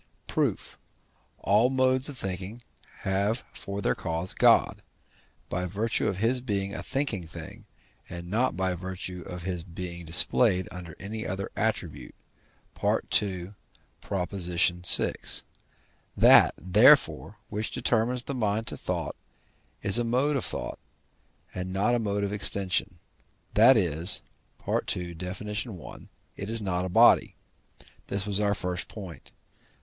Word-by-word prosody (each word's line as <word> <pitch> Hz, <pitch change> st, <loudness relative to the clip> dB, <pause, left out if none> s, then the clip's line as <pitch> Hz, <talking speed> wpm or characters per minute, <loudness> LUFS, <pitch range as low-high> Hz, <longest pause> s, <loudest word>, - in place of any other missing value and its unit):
Proof. -, -, -1 dB, 0.6 s
All 105 Hz, +5 st, +3 dB
modes 130 Hz, +1 st, +2 dB
of 140 Hz, -, -8 dB
thinking 95 Hz, +4 st, -5 dB, 0.4 s
have 100 Hz, +5 st, 0 dB
for 100 Hz, 0 st, -6 dB
their -, -, +2 dB
cause 85 Hz, +1 st, -3 dB
God, -, -, +4 dB, 0.7 s
by 90 Hz, +1 st, -3 dB
virtue 105 Hz, +5 st, 0 dB
of 95 Hz, -, -1 dB
his 120 Hz, +5 st, +1 dB
being 100 Hz, -5 st, -2 dB
a -, -, -4 dB
thinking 130 Hz, -, -2 dB
thing, 80 Hz, 0 st, -10 dB, 0.4 s
and 85 Hz, -1 st, -7 dB
not 110 Hz, +1 st, 0 dB
by 95 Hz, -1 st, 0 dB
virtue 90 Hz, 0 st, -6 dB
of 90 Hz, -1 st, -7 dB
his 90 Hz, -2 st, -3 dB
being 85 Hz, 0 st, -7 dB
displayed 90 Hz, +4 st, +2 dB
under 85 Hz, -3 st, -9 dB
any 110 Hz, +4 st, -5 dB
other 95 Hz, +1 st, -4 dB
attribute -, -, -3 dB, 0.7 s
(II. 95 Hz, -2 st, +1 dB, 0.5 s
vi.). 90 Hz, -2 st, +2 dB, 1.0 s
That, -, -, +7 dB
therefore, 95 Hz, +3 st, +4 dB
which 105 Hz, +1 st, -3 dB
determines 120 Hz, +2 st, 0 dB
the 140 Hz, -, -5 dB
mind 110 Hz, -3 st, -1 dB
to -, -, -5 dB
thought -, -, -3 dB, 0.7 s
is 100 Hz, +3 st, +5 dB
a -, -, +1 dB
mode 130 Hz, +5 st, +1 dB
of 135 Hz, -, 0 dB
thought, -, -, -4 dB, 0.7 s
and 90 Hz, 0 st, -5 dB
not 100 Hz, +6 st, +1 dB
a 120 Hz, -, +2 dB
mode 100 Hz, -2 st, -1 dB
of 100 Hz, 0 st, -2 dB
extension; 100 Hz, -2 st, 0 dB, 0.6 s
that 115 Hz, +4 st, +7 dB
is 85 Hz, -1 st, +2 dB, 0.4 s
(II. 90 Hz, -1 st, -2 dB
Def. 90 Hz, +4 st, -6 dB
i.), 105 Hz, -, -6 dB, 0.4 s
it 100 Hz, -, -5 dB
is 115 Hz, 0 st, 0 dB
not 90 Hz, -3 st, -2 dB
body. -, -, +5 dB, 0.7 s
This 100 Hz, 0 st, -2 dB
was 100 Hz, -1 st, -1 dB
our 105 Hz, -1 st, +1 dB
first 90 Hz, -2 st, -2 dB
point. 95 Hz, -6 st, -10 dB
100 Hz, 130 wpm, -27 LUFS, 90-110 Hz, 1.0 s, That